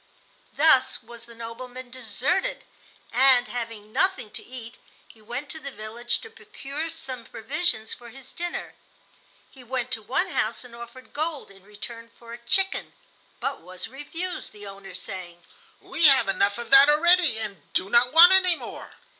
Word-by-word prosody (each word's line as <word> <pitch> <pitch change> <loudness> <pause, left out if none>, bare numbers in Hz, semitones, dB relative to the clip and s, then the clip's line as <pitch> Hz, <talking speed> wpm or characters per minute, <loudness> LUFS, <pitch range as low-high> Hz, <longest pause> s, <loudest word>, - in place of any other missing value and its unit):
Thus 265 -5 +4
was 235 0 -13
the 235 - -14
"nobleman" 245 +2 -8
deserted, 255 - -1 0.5
and, 250 0 +5
having 225 -3 -6
nothing 380 - +1
to - - -7
eat, 245 -1 -10 0.3
he 220 - -19
went 245 +6 -6
to 320 - -4
the 280 -2 -6
village 235 +1 -3
to 455 - -11
procure 305 -7 -6
some 270 -6 -7
provisions 235 -2 -1
for 240 -1 -10
his 265 +2 -13
dinner. 350 0 -4 0.8
He 265 - -15
went 255 0 -3
to 230 - -1
one 230 +5 0
house - - -1
and 245 -1 -13
offered 235 +2 -12
gold 305 -6 -3
in 195 -1 -18
return 230 +3 -9
for 235 0 -13
a 235 - -8
chicken, 380 +11 0 0.5
but 275 - -3
was 185 +1 -5
refused, 325 +7 -6
the 205 -1 -11
owner 195 -2 -10
saying: 175 -2 -7 0.4
"We 325 -1 +3
have 270 -7 +5
enough 200 +2 +1
of 235 - -7
that 275 +1 +9
already 335 -3 +4
and 200 -8 -6
do 185 - +1
not 240 +4 +4
want 335 +4 +10
any 370 -2 +5
more." - - -9
245 Hz, 165 wpm, -25 LUFS, 220-290 Hz, 0.8 s, want